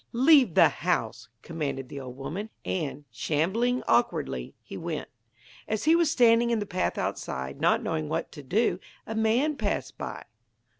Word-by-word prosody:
'Leave 260 - +5
the - - +8
house!' 160 -14 -2
commanded 145 -5 -4
the 140 - -7
old 130 -1 -8
woman. 165 +11 -5 0.2
And, 150 -5 -3
shambling 190 - 0
awkwardly, 65 - 0
he - - -9
went. 165 -2 -4 0.6
As 220 0 -2
he 320 +2 +5
was 335 -2 +3
standing 235 -2 +4
in 235 - +2
the 205 - -2
path 185 -1 -1
outside, 65 +1 -4
not - - +3
knowing 75 -1 -2
what - - -2
to - - -9
do, 185 - +1 0.3
a 220 - -5
man 235 +7 +1
passed - - -2
by. - - -5
180 Hz, 160 wpm, -27 LUFS, -, 0.6 s, the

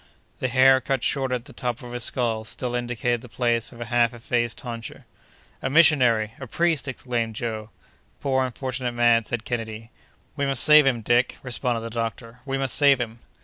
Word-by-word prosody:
The 130 - 0
hair, 130 +1 +5
cut 135 -2 -2
shorter 130 -2 0
on 120 - -5
the - - -14
top 125 0 -4
of 120 - -9
his 120 -1 -4
skull, 115 -4 -1
still 120 +2 -5
indicated 120 -1 -1
the 125 - -12
place 120 -1 -1
of 120 - -14
a 120 - -5
half 120 0 +1
effaced 120 0 -2
tonsure. 115 -4 -8 0.6
"A 130 - -2
missionary! 130 -8 +4
a 135 - -7
priest!" 165 +1 0
exclaimed 120 -4 -3
Joe. 110 -1 -4 0.5
"Poor, 130 -1 +1
unfortunate 130 0 -3
man!" 120 -1 +3
said 120 0 -4
Kennedy. 115 -1 -5 0.4
"We 140 -2 -1
must 135 -5 +5
save 150 -2 +7
him, 120 -4 +1
Dick!" 120 +3 +1
responded 120 -2 -2
the 115 0 -6
doctor; 115 +1 -5
"we 135 0 -1
must 135 -2 +2
save 140 -2 +5
him!" 115 -1 -5
120 Hz, 190 wpm, -24 LUFS, 115-130 Hz, 0.6 s, save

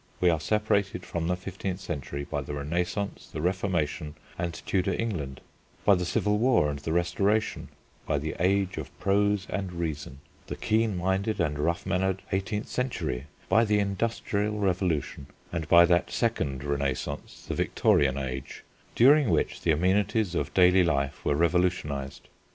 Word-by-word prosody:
We 90 -1 +4
are 80 - 0
separated 100 +1 0
from 85 -1 -3
the 90 - +1
fifteenth 95 0 -5
century 70 -6 -5
by 75 0 -3
the 70 +1 -5
Renaissance, 90 +7 -3
the - - -5
Reformation, 85 -4 -1 0.2
and 85 0 -2
Tudor 95 -1 +1
England, 80 - -3 0.4
by 100 - +7
the 90 -2 +1
Civil 105 +4 +1
War 115 - +3
and 70 - -5
the 70 +3 -4
Restoration, 95 +6 +1 0.4
by - - +1
the 75 +2 -3
"age 95 +1 +1
of - - -5
prose 100 0 +2
and 95 -2 -3
reason," 80 -6 -4 0.3
the - - -4
keen 110 -2 +1
minded 95 +4 0
and 75 -4 0
rough 85 +3 0
mannered 95 0 0
eighteenth 100 +2 -2
century, 125 - -2 0.2
by 115 - +4
the 105 -2 +2
Industrial 105 +1 -1
Revolution, 90 -8 -1 0.3
and 80 -3 -2
by 85 0 +8
that 85 0 +2
second 75 - -1
Renaissance, 70 -2 -3
the - - -2
Victorian 70 -2 +2
Age, 65 -1 -5 0.3
during 140 +1 +6
which - - 0
the - - -1
amenities 95 +4 +2
of - - -1
daily 90 0 +6
life 70 -4 -1
were 70 - +1
revolutionised. 80 -5 0
90 Hz, 155 wpm, -27 LUFS, 75-100 Hz, 0.4 s, by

